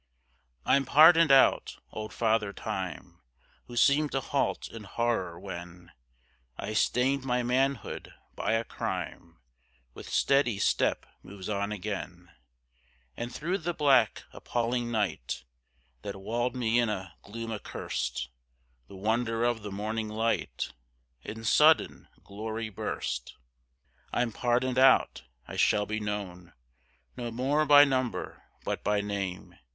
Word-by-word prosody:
I'm 140 Hz, -, +4 dB
pardoned 160 Hz, +2 st, +7 dB
out. 135 Hz, -1 st, +4 dB
Old 110 Hz, 0 st, -6 dB
Father 110 Hz, -3 st, +1 dB
Time 90 Hz, -3 st, -5 dB, 0.5 s
Who 120 Hz, -, -8 dB
seemed 145 Hz, +4 st, +4 dB
to 135 Hz, -, +1 dB
halt 135 Hz, +1 st, -1 dB
in 115 Hz, -2 st, -9 dB
horror, 100 Hz, -7 st, -1 dB
when 90 Hz, -2 st, -9 dB, 0.7 s
I 110 Hz, -, -4 dB
stained 130 Hz, +5 st, +2 dB
my 125 Hz, -1 st, 0 dB
manhood 130 Hz, -1 st, -1 dB, 0.2 s
by -, -, -1 dB
a 115 Hz, 0 st, +1 dB
crime, 85 Hz, -6 st, -5 dB, 0.6 s
With -, -, -10 dB
steady 135 Hz, -6 st, +2 dB
step 105 Hz, -, +1 dB, 0.2 s
moves 95 Hz, 0 st, -9 dB
on 100 Hz, 0 st, -1 dB
again, 90 Hz, -4 st, -6 dB, 0.8 s
And 120 Hz, +1 st, -5 dB
through 175 Hz, +8 st, -2 dB
the 175 Hz, +1 st, -3 dB
black 135 Hz, -7 st, +3 dB
appalling 120 Hz, 0 st, -2 dB
night, 95 Hz, -, -2 dB, 0.6 s
That 100 Hz, -1 st, -6 dB
walled 120 Hz, +5 st, -2 dB
me 120 Hz, -1 st, +2 dB
in 120 Hz, -2 st, +2 dB
a 95 Hz, -5 st, -4 dB
gloom 115 Hz, +2 st, -7 dB
accurst, 65 Hz, -, -4 dB, 0.6 s
The 100 Hz, -, -12 dB
wonder 115 Hz, +3 st, 0 dB
of 120 Hz, -2 st, +1 dB
the 105 Hz, -1 st, -6 dB
morning 110 Hz, +2 st, -3 dB
light 110 Hz, -, -2 dB, 0.5 s
In 110 Hz, -, -8 dB
sudden 150 Hz, +7 st, +4 dB, 0.2 s
glory 110 Hz, +2 st, -5 dB
burst. 65 Hz, -, -4 dB, 0.8 s
I'm 120 Hz, -1 st, 0 dB
pardoned 125 Hz, +3 st, +1 dB
out. 130 Hz, -, +4 dB, 0.2 s
I -, -, -7 dB
shall 105 Hz, -, +3 dB
be 110 Hz, +1 st, -3 dB
known 100 Hz, -4 st, -5 dB, 0.6 s
No 120 Hz, -1 st, -4 dB
more 135 Hz, +6 st, +1 dB
by 145 Hz, 0 st, +9 dB
number, 130 Hz, -3 st, -2 dB, 0.2 s
but -, -, -3 dB
by 105 Hz, 0 st, +1 dB
name. 100 Hz, -3 st, -5 dB
115 Hz, 125 wpm, -29 LUFS, 100-125 Hz, 0.8 s, by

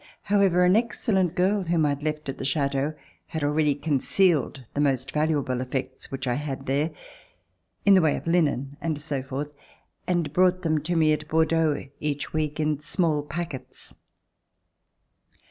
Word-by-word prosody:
However, 195 Hz, -3 st, +3 dB
an 180 Hz, +2 st, +5 dB
excellent 210 Hz, -6 st, +1 dB
girl 195 Hz, +2 st, +2 dB
w^hom 165 Hz, -2 st, +2 dB
I -, -, +2 dB
had 140 Hz, 0 st, -2 dB
left 150 Hz, 0 st, -3 dB
at 135 Hz, -, -5 dB
the -, -, -4 dB
Chateau 140 Hz, +1 st, 0 dB, 0.3 s
had 160 Hz, -2 st, -4 dB
already 150 Hz, 0 st, +2 dB
concealed 145 Hz, 0 st, +1 dB
the 145 Hz, -, 0 dB
most 135 Hz, -2 st, +1 dB
valuable 150 Hz, -5 st, 0 dB
effects 130 Hz, 0 st, -4 dB
which 135 Hz, -1 st, -5 dB
I 125 Hz, -, +1 dB
had 135 Hz, -1 st, -4 dB
there, 145 Hz, +4 st, +1 dB, 1.0 s
in 200 Hz, -, +7 dB
the 190 Hz, -, +6 dB
way 155 Hz, -3 st, +3 dB
of -, -, -8 dB
linen 145 Hz, -5 st, +1 dB
and 160 Hz, -3 st, -2 dB
so 145 Hz, -3 st, -3 dB
forth, 135 Hz, +3 st, -5 dB, 0.5 s
and 170 Hz, -5 st, 0 dB
brought 185 Hz, 0 st, +3 dB
them 155 Hz, -2 st, +1 dB
to 175 Hz, +1 st, 0 dB
me 155 Hz, -2 st, +4 dB
at 150 Hz, 0 st, -3 dB
Bordeaux 160 Hz, -2 st, +2 dB
each 145 Hz, -1 st, -3 dB
week 155 Hz, -1 st, -1 dB
in 150 Hz, -2 st, 0 dB
small 155 Hz, -1 st, 0 dB
packets. 150 Hz, -2 st, -7 dB
150 Hz, 165 wpm, -26 LUFS, 140-170 Hz, 1.0 s, in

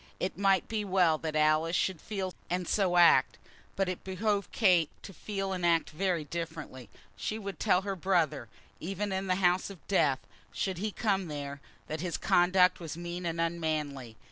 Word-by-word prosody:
It 185 Hz, -, -2 dB
might 195 Hz, -1 st, +2 dB
be 220 Hz, -2 st, -2 dB
well 180 Hz, -5 st, +3 dB
that 155 Hz, -1 st, -4 dB
Alice 155 Hz, +2 st, +3 dB
should 185 Hz, -3 st, 0 dB
so -, -, -22 dB
feel 195 Hz, -3 st, -3 dB, 0.2 s
and 180 Hz, 0 st, -1 dB
so 185 Hz, -4 st, +2 dB
act, 175 Hz, -1 st, +5 dB, 0.4 s
but 195 Hz, -, 0 dB
it 185 Hz, -1 st, -4 dB
behoved 200 Hz, +1 st, -1 dB
Kate 180 Hz, -8 st, +3 dB
to 195 Hz, -, -9 dB
feel 195 Hz, +2 st, -4 dB
and 180 Hz, -1 st, -4 dB
act 170 Hz, -2 st, +2 dB
very 175 Hz, 0 st, 0 dB
differently. 155 Hz, -5 st, -6 dB, 0.3 s
She 215 Hz, -, -3 dB
would 200 Hz, -6 st, -6 dB
tell 180 Hz, +1 st, +3 dB
her 195 Hz, -1 st, -2 dB
brother, 170 Hz, -, 0 dB, 0.3 s
even 195 Hz, +4 st, -3 dB
in 190 Hz, 0 st, -2 dB
the 185 Hz, -, +2 dB
house 180 Hz, 0 st, +2 dB
of 195 Hz, -4 st, -13 dB
death, 150 Hz, -9 st, +2 dB, 0.3 s
should 190 Hz, -3 st, -2 dB
he 215 Hz, +3 st, -1 dB
come 195 Hz, -4 st, 0 dB
there, 140 Hz, -2 st, -6 dB, 0.2 s
that 155 Hz, 0 st, -5 dB
his 175 Hz, -2 st, -2 dB
conduct 180 Hz, +1 st, +4 dB
was 165 Hz, -2 st, -6 dB
mean 175 Hz, +1 st, -5 dB
and 165 Hz, 0 st, -3 dB
unmanly. 155 Hz, -8 st, -2 dB
180 Hz, 185 wpm, -30 LUFS, 160-195 Hz, 0.4 s, act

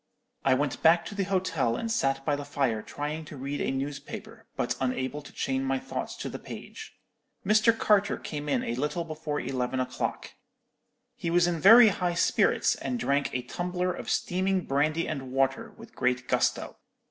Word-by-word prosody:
"I 130 Hz, -1 st, +4 dB
went 140 Hz, 0 st, -1 dB
back 170 Hz, +1 st, +5 dB
to -, -, -6 dB
the 200 Hz, -1 st, -1 dB
hotel 180 Hz, -11 st, 0 dB
and 230 Hz, -, -3 dB
sat 135 Hz, -11 st, 0 dB
by 145 Hz, -, +2 dB
the 145 Hz, -, -5 dB
fire 135 Hz, -6 st, -1 dB
trying 150 Hz, +6 st, -5 dB
to 145 Hz, -, -10 dB
read 140 Hz, +2 st, -4 dB
a -, -, 0 dB
newspaper, 135 Hz, +2 st, -6 dB
but -, -, -1 dB
unable 130 Hz, +2 st, -1 dB
to 145 Hz, -, -13 dB
chain 130 Hz, 0 st, -1 dB
my 135 Hz, 0 st, 0 dB
thoughts -, -, -5 dB
to -, -, -5 dB
the -, -, -6 dB
page. -, -, -10 dB, 0.5 s
Mr. 215 Hz, +3 st, +4 dB
Carter 205 Hz, -2 st, +3 dB
came 150 Hz, -1 st, -5 dB
in -, -, +1 dB
a 115 Hz, -, -2 dB
little 150 Hz, +7 st, -1 dB
before 155 Hz, -2 st, -4 dB
eleven 130 Hz, 0 st, -2 dB
o'clock. 125 Hz, 0 st, -3 dB, 0.8 s
He 170 Hz, -, -3 dB
was 175 Hz, +1 st, +4 dB
in 175 Hz, -2 st, 0 dB
very 225 Hz, +6 st, +9 dB
high 180 Hz, -2 st, -1 dB
spirits, -, -, +3 dB
and 250 Hz, -, -3 dB
drank 140 Hz, -7 st, +1 dB
a 125 Hz, -, -1 dB
tumbler 180 Hz, +6 st, -2 dB
of -, -, -7 dB
steaming 185 Hz, +1 st, +1 dB
brandy 155 Hz, +4 st, +1 dB
and 135 Hz, -4 st, -4 dB
water 135 Hz, 0 st, 0 dB
with -, -, -13 dB
great 125 Hz, 0 st, 0 dB
gusto. -, -, 0 dB
145 Hz, 180 wpm, -28 LUFS, 135-180 Hz, 0.8 s, very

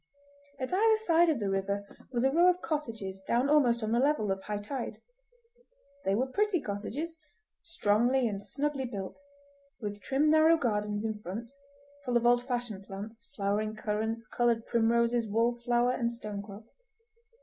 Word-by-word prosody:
At 260 Hz, +6 st, -3 dB
either 440 Hz, +3 st, +4 dB
side 345 Hz, -5 st, +3 dB
of 300 Hz, -6 st, +1 dB
the 200 Hz, -2 st, -1 dB
river 200 Hz, +1 st, -1 dB, 0.3 s
was 240 Hz, -2 st, 0 dB
a 265 Hz, -, +4 dB
row 345 Hz, +5 st, +5 dB
of 360 Hz, 0 st, +1 dB
cottages 225 Hz, -11 st, -3 dB
down 240 Hz, +7 st, +1 dB
almost 245 Hz, -6 st, +4 dB
on 215 Hz, -, -1 dB
the 235 Hz, -, +3 dB
level 265 Hz, -7 st, +2 dB
of 190 Hz, 0 st, -2 dB
high 210 Hz, +1 st, -3 dB
tide. 235 Hz, +5 st, -5 dB, 1.1 s
They 195 Hz, -, +2 dB
were 250 Hz, +5 st, +1 dB
pretty 400 Hz, +7 st, +1 dB
cottages, 285 Hz, +10 st, -5 dB, 0.4 s
strongly 245 Hz, -4 st, +2 dB
and 200 Hz, -3 st, -3 dB
snugly 280 Hz, +3 st, -2 dB
built, 200 Hz, -1 st, -6 dB, 0.6 s
with 205 Hz, -2 st, -5 dB
trim 280 Hz, +8 st, +2 dB
narrow 315 Hz, +1 st, +6 dB
gardens 210 Hz, -5 st, -1 dB
in 220 Hz, -1 st, -2 dB
front, 215 Hz, +5 st, -6 dB, 0.5 s
full 245 Hz, -3 st, +1 dB
of 235 Hz, -, -1 dB
old 245 Hz, 0 st, +4 dB
fashioned 240 Hz, -6 st, -3 dB
plants, 215 Hz, +4 st, -8 dB
flowering 210 Hz, +2 st, -1 dB
currants, 220 Hz, +1 st, -2 dB
coloured 235 Hz, -2 st, +1 dB
primroses, 235 Hz, 0 st, +2 dB
wallflower, 240 Hz, +2 st, +2 dB
and 235 Hz, -2 st, 0 dB
stonecrop. 210 Hz, -2 st, -7 dB
235 Hz, 155 wpm, -30 LUFS, 210-270 Hz, 1.1 s, narrow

